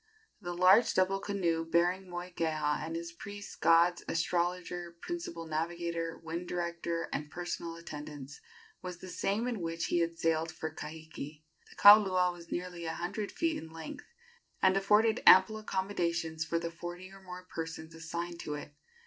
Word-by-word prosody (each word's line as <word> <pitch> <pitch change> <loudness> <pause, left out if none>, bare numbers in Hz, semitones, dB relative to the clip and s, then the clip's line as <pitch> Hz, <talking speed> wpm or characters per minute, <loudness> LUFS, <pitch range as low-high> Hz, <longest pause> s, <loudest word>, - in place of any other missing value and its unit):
The 175 0 -4
large 190 +6 +6
double 190 +1 +3
canoe 175 -5 0
bearing 175 +3 +1
Moikeha 165 -4 -1
and 165 - -4
his 170 0 -4
priests, 205 +4 -8
gods, 170 +2 +4
astrologer, 175 +1 -1
principal 335 - -5
navigator, 165 +1 -2
wind 165 +2 -5
director 170 -1 -2
and 150 0 -3
personal 175 0 -4
attendants, 150 -4 -8 0.4
was 180 -2 -6
the 185 - -10
same 200 +5 -1
in 235 -4 -2
which 165 0 -2
he 175 - +4
had 165 0 0
sailed 165 0 +1
for 160 -1 -5
Kahiki. 155 -1 -8 0.3
The - - -16
kaulua 190 -3 +7
was 170 -1 -13
nearly 175 -1 -4
a 160 - -2
hundred 200 +5 -3
feet 330 -1 -1
in 160 - -10
length, 160 -1 -8 0.5
and 190 0 +4
afforded 210 +3 +4
ample 205 +4 +8
accommodations 170 -6 -1
for 170 +1 -1
the 170 0 -3
forty 175 +2 -7
or 195 0 -13
more 180 -1 -9
persons 160 -2 -6
assigned 170 +1 -5
to 150 -3 -4
it. 145 0 -8
170 Hz, 155 wpm, -32 LUFS, 165-185 Hz, 0.5 s, ample